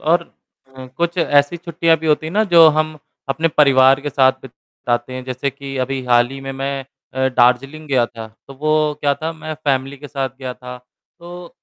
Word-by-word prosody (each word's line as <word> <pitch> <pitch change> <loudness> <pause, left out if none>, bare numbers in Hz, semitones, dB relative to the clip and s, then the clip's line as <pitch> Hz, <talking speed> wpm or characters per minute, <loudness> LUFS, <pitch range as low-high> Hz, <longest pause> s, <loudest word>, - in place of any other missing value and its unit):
और 170 +2 +2 0.6
उ 130 - -8
कुछ 170 +1 -1
ऐसी 145 0 +2
छुट्टियाँ 170 -1 +1
भी 160 - -5
होती 155 0 +1
है 160 - -6
ना 210 +3 +3
जो 165 -1 +9
हम 155 0 -1 0.3
अपने 160 +4 +1
परिवार 135 -3 +5
के 145 0 -4
साथ 130 0 +4
बिताते 125 -1 -5
है 130 - -5
जैसे 130 +2 -3
कि 135 0 -8
अभी 135 0 -4
हाल 120 -1 +3
ही 135 - -8
में 135 0 -6
मैं 135 0 -4 0.3
अ, 130 0 +1
दार्जिलिंग 130 +5 +1
गया 130 -4 +3
था 115 -2 -9 0.2
तो 135 - -10
वो 155 0 +1
क्या 145 -1 +2
था 160 +3 -4
मैं 155 -1 -7
फैमिली 135 0 0
के 145 +1 -11
साथ 135 -2 -2
गया 130 -2 -6
था 125 0 -9
तो 175 +7 -14
140 Hz, 200 wpm, -19 LUFS, 130-155 Hz, 0.6 s, जो